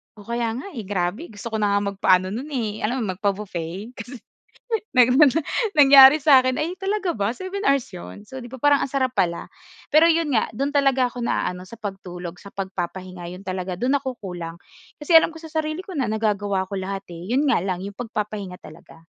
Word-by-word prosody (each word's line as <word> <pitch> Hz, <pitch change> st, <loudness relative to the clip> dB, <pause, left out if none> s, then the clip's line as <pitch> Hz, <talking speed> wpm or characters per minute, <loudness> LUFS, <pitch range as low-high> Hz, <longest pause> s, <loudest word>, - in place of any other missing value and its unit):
Oh, 210 Hz, -, -13 dB
kaya 235 Hz, +1 st, -2 dB
nga, 300 Hz, +11 st, -7 dB
eh, 225 Hz, -, -7 dB
grabe 200 Hz, -, -2 dB
gusto 220 Hz, +2 st, -8 dB
ko 220 Hz, -, -1 dB
na 205 Hz, -1 st, +2 dB
nga 200 Hz, -, +1 dB
magpaano 185 Hz, -1 st, +2 dB
no'n 255 Hz, +7 st, -5 dB
eh, 215 Hz, -4 st, -2 dB
alam 240 Hz, +3 st, -1 dB
mo, 195 Hz, -, -1 dB
magpa-buffet 195 Hz, 0 st, -3 dB
kasi 255 Hz, -, -8 dB, 0.8 s
nang 250 Hz, 0 st, +5 dB, 0.6 s
nangyari 280 Hz, -1 st, +8 dB
sa 275 Hz, -3 st, +6 dB
akin, 255 Hz, 0 st, 0 dB
"Ay, 340 Hz, +4 st, -2 dB
talaga 390 Hz, -1 st, -2 dB
ba? 205 Hz, +1 st, 0 dB
Seven 375 Hz, +9 st, -6 dB
hours 275 Hz, -6 st, +2 dB
'yon?" 205 Hz, +4 st, -10 dB
So, 260 Hz, +1 st, -8 dB
'di 240 Hz, -, -11 dB
ba 260 Hz, -, -8 dB
parang 290 Hz, 0 st, +4 dB
ang 270 Hz, -, -4 dB
sarap 260 Hz, -2 st, 0 dB
pala. 175 Hz, -3 st, 0 dB, 0.4 s
Pero 310 Hz, +2 st, +5 dB
'yon 330 Hz, -1 st, +1 dB
nga, 220 Hz, -, +1 dB
do'n 275 Hz, +6 st, -3 dB
talaga 270 Hz, -3 st, +3 dB
ako 245 Hz, 0 st, -6 dB
naaano, 180 Hz, -5 st, -1 dB
sa 215 Hz, +5 st, -12 dB
pagtulog, 180 Hz, -4 st, -7 dB
sa 200 Hz, -, -11 dB
pagpapahinga, 185 Hz, -1 st, -5 dB
'yon 185 Hz, +1 st, -11 dB
talaga, 185 Hz, -1 st, -4 dB
do'n 260 Hz, +5 st, +2 dB
ako 260 Hz, -3 st, -3 dB
kulang. 175 Hz, -4 st, -7 dB, 0.4 s
Kasi 300 Hz, +3 st, +2 dB
alam 325 Hz, 0 st, +7 dB
ko 325 Hz, -, -11 dB
sa 320 Hz, -, -10 dB
sarili 310 Hz, 0 st, -2 dB
ko 370 Hz, -, -7 dB
na 250 Hz, -6 st, -1 dB
nagagawa 205 Hz, -3 st, 0 dB
ko 200 Hz, -, -5 dB
lahat, 195 Hz, +1 st, -4 dB
eh. 175 Hz, +5 st, -8 dB
'Yon 280 Hz, +3 st, +2 dB
nga 235 Hz, -9 st, +2 dB
lang 185 Hz, -2 st, -2 dB
yung 200 Hz, +2 st, -7 dB
pagpapahinga 210 Hz, -5 st, -5 dB
talaga. 165 Hz, 0 st, -15 dB
220 Hz, 205 wpm, -23 LUFS, 190-270 Hz, 0.8 s, nangyari